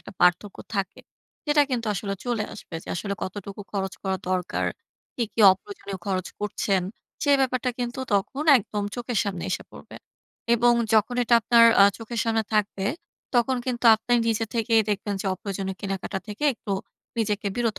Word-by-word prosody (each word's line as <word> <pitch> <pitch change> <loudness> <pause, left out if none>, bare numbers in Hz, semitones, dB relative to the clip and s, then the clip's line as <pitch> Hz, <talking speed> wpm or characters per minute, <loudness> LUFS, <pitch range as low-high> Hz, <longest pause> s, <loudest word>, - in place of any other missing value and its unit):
একটা - - -12
পার্থক্য 180 +3 +3 0.2
থাকে, 195 -2 -2 0.5
সেটা 295 0 +5
কিন্তু 235 -3 -1
আসলে 195 +1 -3
চলে 235 -3 -1
আসবে 205 - -11
যে - - -14
আসলে 200 +3 -3
কতটুকু 200 +1 -6
খরচ 195 -1 -2
করা 190 -1 0
দরকার, 180 -1 -1 0.5
কি, 240 - 0
কি, 225 - -2
অপ্রয়োজনীয় 195 0 -8
খরচ 185 -2 -1
করছেন, 205 -2 0 0.4
সে 285 - +2
ব্যাপারটা 255 -1 +1
কিন্তু 245 +1 -3 0.2
তখন 210 +9 -1
একদম 205 -1 -4
চোখের 245 -3 -2
সামনে 185 -4 -3
এসে - - -2
পড়বে। - - -12 0.6
এবং 240 +1 +4 0.2
যখন 220 +3 +3
এটা 235 0 +3
আপনার 230 +1 +6 0.2
আ - - +9
চোখের 230 0 -4
সামনে 225 -1 +1
থাকবে, 205 -2 0 0.5
তখন 255 +2 +3
কিন্তু 245 -1 -3
আপনে 225 +3 -3
নিজে 225 0 +1
থেকেই 225 -1 +3
দেখবেন 205 0 -2
যে - - -5
অপ্রয়োজনীয় 195 -1 -5
কেনাকাটা 195 0 -3
থেকে 210 +8 -4
একটু 205 -3 -5 0.5
নিজেকে 210 -2 -1
বিরত 230 -3 0
210 Hz, 165 wpm, -25 LUFS, 195-235 Hz, 0.6 s, আ